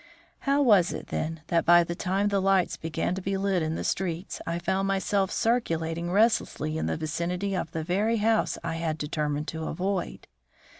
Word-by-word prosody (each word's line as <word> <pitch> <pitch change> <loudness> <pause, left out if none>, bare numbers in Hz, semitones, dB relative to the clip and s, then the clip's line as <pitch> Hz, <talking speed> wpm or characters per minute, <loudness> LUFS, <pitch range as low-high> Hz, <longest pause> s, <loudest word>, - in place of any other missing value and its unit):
How 285 +1 +4
was 205 -9 +5
it, - - -7
then, 160 0 -3
that 170 - +2
by 175 0 +6
the 170 - -4
time 190 +4 0
the 200 -1 +1
lights 190 -2 +2
began 160 +2 -2
to 190 - -4
be 195 +1 -1
lit 195 -2 +1
in 160 0 -1
the - - -3
streets 180 -1 -2
I 170 0 -1
found 190 +3 0
myself 195 0 +1
circulating 170 -8 0
restlessly 200 -7 +2
in 160 - -1
the - - -1
vicinity 175 +5 -2
of 175 - -2
the 160 0 -4
very 205 +7 +1
house 220 +1 +1
I 165 -1 -3
had 160 -2 -2
determined 150 -1 -2
to 160 0 -5
avoid? 185 +2 -3
180 Hz, 190 wpm, -27 LUFS, 165-195 Hz, -, by